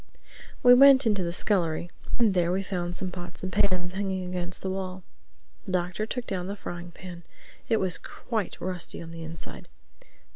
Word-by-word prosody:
We 245 0 +10
went 270 +1 +8
into 210 -4 +3
the 170 -1 -1
scullery 175 -3 +1 0.3
and 225 -5 +4
there 175 -2 +2
we 190 +2 +1
found 175 -2 -3
some 185 -2 -2
pots 175 -1 -7
and 185 -1 -3
pans 180 -2 +2
hanging 190 -1 -2
against 180 0 -4
the 190 - -1
wall. 185 -1 -4 0.6
The 185 - -3
Doctor 180 +4 0
took 245 +1 -3
down 185 -2 -3
the 200 - -3
frying 175 -3 -6
pan. 175 0 -9 0.5
It 225 - +4
was 185 -4 +1
quite 220 -6 -4
rusty 180 -1 -3
on 165 0 -8
the 165 0 -8
inside. 160 0 -8
185 Hz, 180 wpm, -28 LUFS, 175-195 Hz, 0.6 s, We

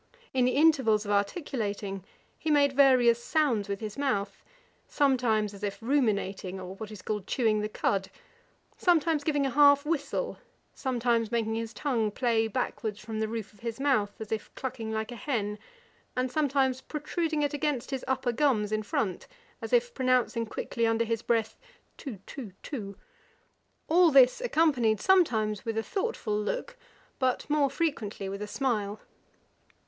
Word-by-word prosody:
In 255 -2 +3
the 250 - +2
intervals 265 -9 +4
of 205 - -2
articulating 205 - -2 0.3
he 315 - -4
made 285 -2 +4
various 250 -4 +5
sounds 245 -11 +1
with 200 +1 -3
his 215 +4 -6
mouth, 200 -8 -1 0.5
sometimes 240 -7 +2
as 200 - -11
if 200 -1 -2
ruminating, 200 -7 0
or 185 0 -7
what 215 +1 -7
is 210 -4 -10
called 210 -3 -3
chewing 220 -4 +1
the 210 - -2
cud, 195 -2 -1 0.7
sometimes 325 -4 +3
giving 290 -2 +1
a 270 - 0
half 285 +1 +6
whistle, 315 - -2 0.3
some 260 -3 -3
times 230 -2 +1
making 225 -2 0
his 225 0 -3
tongue 235 -7 0
play 225 0 +1
backwards 220 -2 -3
from 220 0 -5
the 220 - 0
roof 220 -2 -5
of 210 - -22
his 230 +1 -5
mouth, 255 -8 +1
as 220 -2 -7
if 220 -1 -3
clucking 255 -4 -4
like 220 +2 -3
a - - -6
hen, 210 -4 -2 0.6
and 255 0 0
sometimes 270 -3 +1
protruding 305 +2 -2
it 290 0 0
against 290 -3 -1
his 265 -2 -3
upper 260 -1 0
gums 235 -5 +1
in 215 0 0
front, 200 -3 -2 0.3
as - - -6
if 485 0 +2
pronouncing 255 -3 +1
quickly 230 +1 -2
under 225 +1 +1
his 230 -1 -1
breath, 225 -2 0 0.4
too, 260 -8 -7
too, 235 -10 -8
too: 200 -9 -6 0.9
all 345 +1 +5
this 270 - +6
accompanied 295 - +2
sometimes 220 - +2
with 225 -2 -3
a 225 - 0
thoughtful 390 - -2
look, - - -3 0.4
but 255 -2 0
more 295 -2 +3
frequently 245 - -2
with 200 +1 -5
a 210 - -4
smile. 215 -5 -1
235 Hz, 165 wpm, -29 LUFS, 215-280 Hz, 0.9 s, half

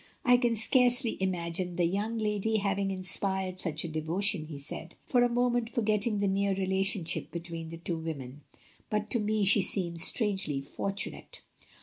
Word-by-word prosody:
I 245 0 +6
can 240 -2 +1
scarcely 245 +1 +3
imagine 180 -1 -2
the 175 -1 +1
young 205 +6 -2
lady 215 0 0
having 200 -1 -1
inspired 185 0 -1
such 155 -4 -2
a - - -3
devotion," 160 +2 -1
he 150 -3 -8
said, 160 +4 -7
for 245 - +2
a 245 - +3
moment 240 -1 0
forgetting 215 -2 0
the 200 0 0
near 195 0 +1
relationship 190 -2 0
between 165 -1 -6
the 165 - -8
two 170 0 -4
women; 145 -4 -7 0.5
"but 210 0 -2
to 240 - +3
me 210 -1 0
she 200 +1 +7
seems 170 -3 +3
strangely 195 - +2
fortunate." 195 +8 -4
195 Hz, 160 wpm, -29 LUFS, 170-215 Hz, 0.5 s, she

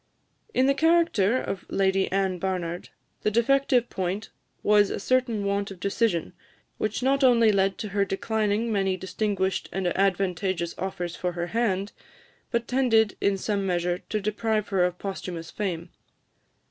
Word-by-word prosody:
In 255 - +4
the 275 - +4
character 320 - +3
of 195 - -4
Lady 195 0 +1
Anne 190 -1 0
Barnard, 175 -1 -3 0.3
the - - +2
defective 245 +2 +2
point 190 +3 -3 0.3
was 205 -1 +5
a - - -3
certain 235 -2 +1
want 200 0 0
of 195 -2 -10
decision, 200 -3 0 0.5
which 215 +3 -1
not 275 +1 +2
only 235 -4 +6
led 195 -1 +1
to 215 - -5
her 200 +1 +1
declining 215 +2 -1
many 195 -3 +1
distinguished 190 +1 -1
and 190 -1 -2
advantageous 185 -2 0
offers 180 -2 -3
for 180 -1 -2
her 175 0 -2
hand, 205 -4 0 0.6
but 235 0 -1
tended, 225 -5 +3
in 200 -1 +2
some 200 +1 -1
measure, 175 -1 0
to 215 - 0
deprive 215 +1 -1
her 190 -3 +2
of 180 0 -2
posthumous 180 -4 -6
fame. 175 -4 -4
200 Hz, 150 wpm, -26 LUFS, 185-225 Hz, 0.6 s, only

